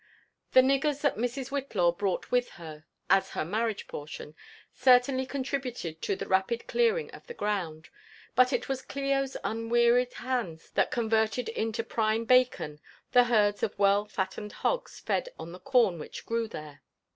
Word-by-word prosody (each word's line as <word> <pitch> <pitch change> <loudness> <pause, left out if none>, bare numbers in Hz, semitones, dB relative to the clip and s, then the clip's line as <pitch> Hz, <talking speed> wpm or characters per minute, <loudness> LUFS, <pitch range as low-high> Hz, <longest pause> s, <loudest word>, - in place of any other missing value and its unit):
The 260 - +9
niggers 275 +2 +1
that 285 - +2
Mrs. 245 +3 -2
Whitlaw 225 -11 +1
brought 195 0 -2
with 245 0 +2
her 155 -3 -10 0.2
as 195 +1 +3
her - - 0
marriage 215 +4 -1
portion 150 0 -8 0.4
certainly 255 +1 +4
contributed 255 - -4
to 200 - -1
the - - -6
rapid 190 +5 +1
clearing 475 0 +1
of - - -13
the 475 - -8
ground; 175 -7 -3 0.4
but 255 +2 +4
it - - -1
was 270 -1 -2
Clio's 275 -1 -1
un 225 +1 -3
wearied 240 +1 +3
hands 235 -11 -4
that - - +2
converted 225 0 0
into 225 0 -2
prime 225 0 0
bacon 250 -12 +2 0.3
4he 245 -1 +6
herds 210 -3 +2
of 205 - -2
.well 200 +1 +3
fattened 210 +1 -4
hogs - - -1
fed - - -1
on 170 - -8
the 180 - -10
corn 235 -10 +2
which - - -8
grew 230 0 -1
there. 150 -8 -9
230 Hz, 160 wpm, -29 LUFS, 195-255 Hz, 0.4 s, The